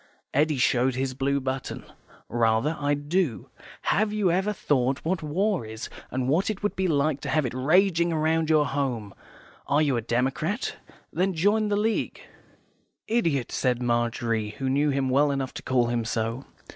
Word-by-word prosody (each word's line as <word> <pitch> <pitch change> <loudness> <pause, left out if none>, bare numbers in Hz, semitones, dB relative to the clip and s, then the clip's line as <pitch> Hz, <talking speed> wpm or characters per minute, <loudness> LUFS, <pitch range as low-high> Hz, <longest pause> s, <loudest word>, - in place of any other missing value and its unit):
Eddy 150 +1 +2
showed 125 0 +2
his 130 0 -1
blue 140 +2 0
button. 130 0 -4 0.4
"Rather, 115 +6 +1
I 145 0 +1
do. 145 - -1 0.3
HAVE 210 +2 +2
YOU 210 -4 +1
EVER 190 +4 +1
THOUGHT 135 -8 0
what 180 +2 0
war 185 - 0
is, 110 +1 -7 0.2
and 130 -1 -2
what 165 +10 +2
it 210 -1 -4
would 205 - 0
be 190 0 0
like 145 -2 +1
to - - -4
have 155 -3 +2
it 120 - -3
raging 170 +5 +3
round 160 0 +1
your 155 -1 +5
own 145 - 0
home? 125 -8 -2 0.5
Are 145 +2 +3
you 140 -5 +1
a - - -1
democrat? 135 - -1 0.4
Then 185 0 0
join 205 +6 +2
the 205 -1 +1
League." 220 +1 -1 0.9
"Idiot," 165 - 0
said 125 -2 0
Margery, 115 -2 0
who 130 +1 -1
knew 145 +2 +2
him 135 -1 0
well 140 +3 +3
enough 135 -2 -2
to - - -7
call 125 -2 +2
him 120 -1 0
so. 115 +3 -2
140 Hz, 175 wpm, -26 LUFS, 125-170 Hz, 0.9 s, your